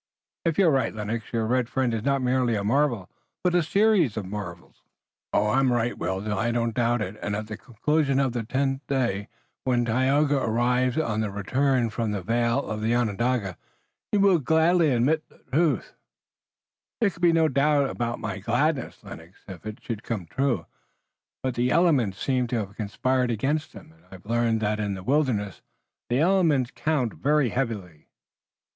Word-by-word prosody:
"If 165 -2 +1
you're 185 -5 +5
right, 135 -5 0
Lennox, 110 +1 -4
your 115 -2 0
red 125 +1 0
friend 130 -3 0
is 110 - -1
not 140 +2 0
merely 125 -2 +1
a 100 - -2
marvel, 120 -4 +1 0.4
but 180 -1 +2
a 175 - +4
series 190 - +2
of 105 - -3
marvels." 95 -3 -8 0.5
"I'm 125 +5 +2
right, 120 0 0
Will. 95 +3 -3
I 105 +3 0
do 115 0 0
not 115 - -2
doubt 120 -1 +1
it. 105 +1 -6
At 105 0 -3
the 110 0 -6
conclusion 140 +5 0
of 135 -3 +1
the 120 - -1
tenth 135 +4 -1
day 120 -7 -1 0.4
when 120 -2 +1
Tayoga 135 +5 +2
arrives 125 +1 +1
on 115 -9 0
the 110 - -1
return 125 +4 0
from 115 0 -2
the 100 -3 -3
vale 115 +5 0
of 110 0 -4
Onondaga 115 -3 0 0.5
you 210 - +2
will 195 -4 +5
gladly 160 +3 +3
admit 140 +6 +1
the - - -22 0.2
truth." 155 -5 +1 1.1
"There 215 -4 +3
can 170 - -16
be 175 -1 +5
no 165 -1 +3
doubt 140 0 +2
about 120 -2 -3
my 100 -2 -5
gladness, 130 +7 -1
Lennox, 85 +4 -12
if 95 +1 -9
it 110 - -8
should 110 -3 -4
come 105 -7 -4
true, 125 - -1 0.8
but 130 -1 -1
the 120 +1 0
elements 135 - +2
seem 130 -2 0
to 120 - -1
have 100 -3 -4
conspired 125 +4 0
against 140 +8 -1
him, 95 -5 -13
and 80 +2 -25
I've 95 0 -13
learned 115 0 +1
that 105 0 0
in 100 -2 -1
the 95 - -8
wilderness 120 - 0 0.5
the 120 - +1
elements 160 -6 +3
count 145 -7 -1
very 145 -2 +2
heavily." 105 - -4
120 Hz, 175 wpm, -25 LUFS, 105-140 Hz, 1.1 s, you're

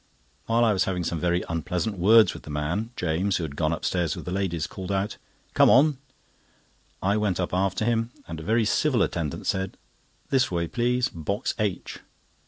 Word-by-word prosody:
While 115 +1 +3
I 110 - +3
was 95 - +1
having 90 -2 -2
some 85 0 -2
very 90 +2 +1
unpleasant 90 +5 -2
words 110 +5 +6
with - - -9
the - - -12
man, 80 +10 -2
James, 90 +3 0
who 85 - -3
had 70 -3 -5
gone 80 +1 0
upstairs 85 0 -1
with - - -8
the 90 - -4
ladies, 90 -4 -1
called 95 0 -6
out: 100 +1 -1 0.4
"Come - - +6
on!" 140 +1 +5 1.0
I 100 +3 +2
went 100 -4 0
up 90 - -2
after 95 +2 0
them, 115 0 +1 0.2
and 80 -2 -6
a - - -8
very 110 +4 +2
civil 120 0 +2
attendant 80 -4 -3
said: 95 0 -2 0.5
"This 130 -1 +3
way, 85 -2 -1
please, 125 +4 +1
box 100 - -3
H." 105 -4 -2
95 Hz, 190 wpm, -26 LUFS, 85-110 Hz, 1.0 s, words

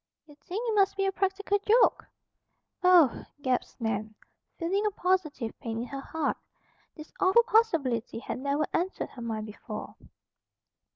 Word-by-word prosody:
"You 300 - -16
think 390 +10 -5
it 450 - +1
must 395 -1 +3
be 390 - +1
a 390 - +2
practical 390 +1 0
joke." 440 +4 +3 0.8
"Oh!" 350 -8 +5 0.2
gasped 255 -1 -1
Nan, 215 -1 -2 0.4
feeling 380 +4 0
a - - +3
positive 360 - -1
pain 225 0 -4
at 245 - -8
her 275 0 -5
heart. 315 0 -2 0.6
This 310 -1 -11
awful 380 +6 +5
possibility 325 - +1
had 235 - -5
never 280 +3 0
entered 365 +3 -1
her 245 - -10
mind 220 -2 -3
before. 210 -1 -8
325 Hz, 150 wpm, -28 LUFS, 245-390 Hz, 0.8 s, Oh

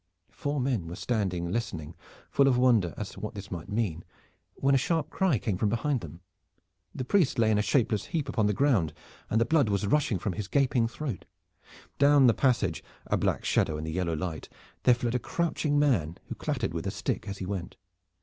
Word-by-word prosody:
The - - -33
four 145 0 -2
men 125 -9 -1
were 85 - -6
standing 90 -4 -1
listening, 90 -9 -3 0.4
full 140 - +4
of 130 -2 +4
wonder 120 -9 +3
as 105 - -5
to - - -11
what 105 +1 -5
this 100 -1 -8
might 85 -3 -6
mean, 100 -7 -1 0.5
when 140 0 +2
a - - +6
sharp 160 +2 -1
cry 185 -9 +2
came 100 -2 -2
from 105 - +2
behind 120 +3 0
them. 85 +2 -10 0.7
The 130 - -3
priest 165 -2 +2
lay 110 -2 +3
in 105 - +3
a - - +4
shapeless 110 -3 +1
heap 155 -4 -2
upon 110 -6 +1
the 105 - +1
ground, 100 - +2 0.4
and 110 - +2
the 115 - +3
blood 145 -4 +3
was 100 0 0
rushing 115 -2 +2
from 95 +2 -3
his 100 +1 -4
gaping 130 -3 +2
throat. 125 - -5 0.7
Down 140 -1 +6
the 120 - +6
passage, 110 - +1 0.2
a - - 0
black - - 0
shadow 75 - +1
in 75 - -5
the 80 - -4
yellow 85 0 -1
light, 80 0 -4 0.4
there 125 - +7
fled 120 -1 -2
a 125 - +1
crouching 160 0 -1
man, 100 - +2
who - - -2
clattered - - -2
with - - -3
a - - +1
stick - - -3
as 100 0 -5
he 95 - -5
went. 90 -2 -4
110 Hz, 215 wpm, -28 LUFS, 95-135 Hz, 0.7 s, there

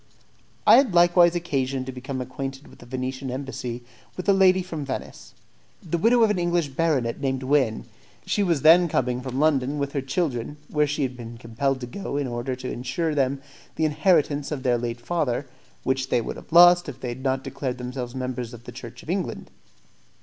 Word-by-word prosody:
I - - +9
had 255 -9 +3
likewise 175 0 +6
occasion 135 -6 -1
to 130 - -5
become 130 +1 -5
acquainted 135 +2 -6
at - - -17
the 120 - -14
Venetian 130 +1 -4
Embassy 125 -2 -5 0.3
with 185 - -5
a 200 - +6
lady 190 -1 +4
from 165 -5 -5
Venice, 135 - -7 0.5
the 170 0 -2
widow 235 +4 +4
of 220 - +4
an 195 - -1
English 175 -3 +1
baronet 135 -5 0
named 135 -1 -1
Wynne. 130 -5 +1 0.4
She 205 - 0
was 170 -8 +1
then 170 +3 +7
coming 125 -5 0
from 130 0 -4
London 145 -2 +2
with 140 -1 -2
her 140 - -1
children, 135 -1 -2
where 150 -1 +2
she 145 0 -1
had 130 -1 -2
been 120 -1 -9
compelled 130 +4 -1
to - - -3
go 140 +3 -5
in 145 - 0
order 120 +1 -3
to 130 0 -6
insure 130 +7 -2
them 135 -1 0 0.3
the 160 - +1
inheritance 150 -3 +2
of 140 -4 -4
their 120 -2 +2
late 120 0 -4
father, 140 -2 -1 0.4
which 130 0 -1
they - - +3
would 115 - -4
have - - -13
lost 175 0 +7
if 135 -2 -9
they 130 - -4
had 120 +2 -6
not 130 0 0
declared 130 -3 -4
themselves 125 0 -5
members 125 -2 -4
of 115 - -14
the 125 - -9
Church 120 0 -10
of - - -13
England. 185 -2 -3
135 Hz, 200 wpm, -24 LUFS, 125-160 Hz, 0.5 s, I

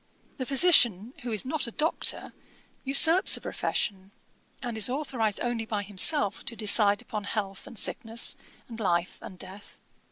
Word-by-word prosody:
The 255 - -6
physician, 250 - +3
who 240 - -7
is 215 +3 +1
not 265 -1 -3
a - - -8
Doctor, 310 +7 -3 0.5
usurps 320 +7 +5
a - - -14
profession, 190 -1 -4 0.5
and 240 -3 -6
is 220 +2 +3
authorised 250 -6 -3
only 240 -2 -3
by 210 -2 -4
himself 205 - +4
to 235 - -6
decide 205 -1 +1
upon 210 -2 -7
health 200 -2 -6
and 235 - -10
sickness, 230 -1 0 0.3
and 230 -1 -11
life 175 -4 -3
and 185 - -12
death. 190 +3 -12
225 Hz, 155 wpm, -26 LUFS, 200-255 Hz, 0.5 s, usurps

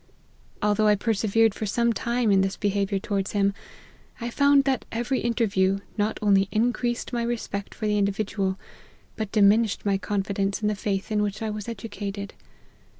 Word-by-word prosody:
Although 210 +1 +3
I 210 - +5
persevered 220 0 +2
for 215 - -4
some 235 +3 +1
time 235 -1 0
in 195 -1 +5
this 195 0 -1
behaviour 200 -1 0
towards 195 0 -2
him, 200 -1 +2 0.7
I 235 0 -4
found 280 +1 +4
that 270 -3 0
every 240 +3 -1
interview 195 -5 +1 0.2
not 210 0 0
only 195 -2 +4
increased 240 +2 0
my 240 - 0
respect 235 -4 -3
for 215 - -4
the 210 -1 +2
in 200 - +3
dividual, 195 -1 -1 0.6
but 215 -2 -4
diminished 210 +1 +3
my 195 -1 +1
confidence 195 -1 -1
in 210 - 0
the - - 0
faith 200 0 -3
in 210 -1 +2
which 210 +2 -2
I 220 - -2
was 210 +1 -5
educated. 200 -2 -6
210 Hz, 170 wpm, -25 LUFS, 200-230 Hz, 0.7 s, I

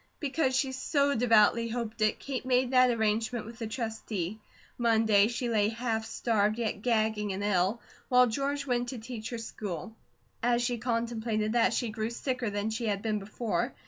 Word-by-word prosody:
Because 275 -2 0
she 265 0 +1
so 280 +2 +1
devoutly 230 -1 +4
hoped 225 -2 -4
it, 215 0 +3
Kate 270 -2 -4
made 255 0 +2
that 255 -1 +6
arrangement 220 0 0
with 230 +1 -10
the 225 - -3
Trustee. 220 -4 -4 0.4
Monday, 220 -3 +4
she 240 +1 -2
lay 215 -3 +2
half 225 -1 -2
starved, 215 -2 +1
yet 220 -3 -2
gagging 220 -3 +1
and 195 +2 -4
ill, 200 +2 +1 0.3
while 250 -1 +6
George 280 +4 -2
went 245 -2 0
to 260 - -5
teach 225 -1 -6
her 235 - -4
school. 220 -2 -6 0.5
As 240 0 +2
she 240 -1 -1
contemplated 230 -2 -1
that, 240 -1 +4
she 240 - -1
grew 220 0 -3
sicker 250 -1 -2
than 205 +2 -2
she 230 +1 -2
had 200 -1 -1
been 215 -2 0
before. 215 +3 -2
230 Hz, 175 wpm, -29 LUFS, 215-245 Hz, 0.5 s, that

